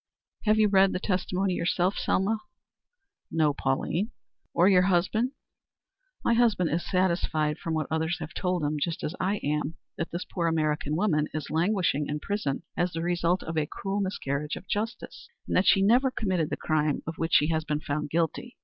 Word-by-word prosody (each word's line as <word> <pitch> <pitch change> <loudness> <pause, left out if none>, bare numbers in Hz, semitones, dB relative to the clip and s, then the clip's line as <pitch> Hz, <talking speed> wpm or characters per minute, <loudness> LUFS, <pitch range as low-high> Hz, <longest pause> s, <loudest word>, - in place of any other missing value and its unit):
"Have 215 0 +4
you 215 -1 +5
read 195 -1 +4
the - - -1
testimony 185 0 0
yourself, 175 +2 +1
Selma?" 215 +4 +1 0.9
"No, 155 -3 +2
Pauline." 150 - -1 0.4
"Or 175 +2 +4
your 185 -2 +6
husband?" 195 +7 +1 0.9
"My 235 - +4
husband 225 -8 +3
is 170 +3 -2
satisfied 170 -5 +1
from 165 -1 -2
what 155 -1 0
others 160 +2 0
have - - -7
told 180 -3 -1
him, 150 +1 0
just 165 +1 -2
as 155 - -2
I 195 +3 +1
am, 150 +2 -1 0.2
that 170 - -2
this 170 - -4
poor 170 -3 -2
American 155 -2 0
woman 155 -5 +1
is 155 -2 -4
languishing 170 -4 +1
in 150 +1 -2
prison 200 -7 -2
as 175 0 0
the 165 0 -3
result 175 +1 +1
of 165 -1 -2
a 150 - -1
cruel 200 +5 -3
miscarriage 150 -6 -2
of - - -10
justice, 220 - -4 0.2
and - - -1
that 185 - +3
she 195 - +5
never 245 +6 +4
committed 185 -10 -1
the - - -2
crime 155 -2 0
of 165 +1 -6
which 165 +1 +1
she 150 - +5
has 160 -1 +1
been 150 -1 -1
found 150 0 -3
guilty. 170 +10 -1
170 Hz, 185 wpm, -27 LUFS, 155-195 Hz, 0.9 s, your